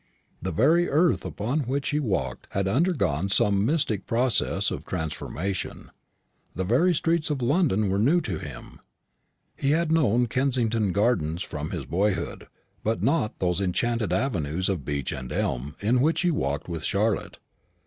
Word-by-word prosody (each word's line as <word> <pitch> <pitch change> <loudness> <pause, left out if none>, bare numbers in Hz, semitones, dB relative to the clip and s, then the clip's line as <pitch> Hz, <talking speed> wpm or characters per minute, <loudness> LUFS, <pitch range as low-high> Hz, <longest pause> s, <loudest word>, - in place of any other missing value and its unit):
The 95 - -2
very 160 - +3
earth 165 +4 +3
upon 120 +9 -2
which 140 +1 -1
he 150 - +1
walked 95 - -2
had 100 0 0
undergone 100 - +1
some 100 0 +3
mystic 115 - 0
process 120 +1 +1
of - - -4
transformation; 80 +5 -4 0.6
the 95 - -1
very 135 - +3
streets 165 0 +1
of 140 -4 -1
London 130 - +2
were 95 +1 0
new 145 +11 +4
to 90 - -4
him. - - -9 0.8
He 135 - -1
had 165 0 +1
known 125 -7 +3
Kensington 115 -4 +1
gardens 95 -5 +1
from 75 0 -5
his - - -4
boyhood; 95 -1 -1 0.4
but 110 -4 -1
not 135 -3 +1
those 90 0 0
enchanted 110 +2 0
avenues 90 - 0
of 90 -9 -2
beech 70 -2 -2
and 65 -1 -6
elm 65 +4 -2
in 120 +5 +2
which 160 +4 +2
he 180 -1 +2
walked 70 - -2
with 85 -3 -5
Charlotte. 105 +1 0
105 Hz, 155 wpm, -26 LUFS, 90-135 Hz, 0.8 s, new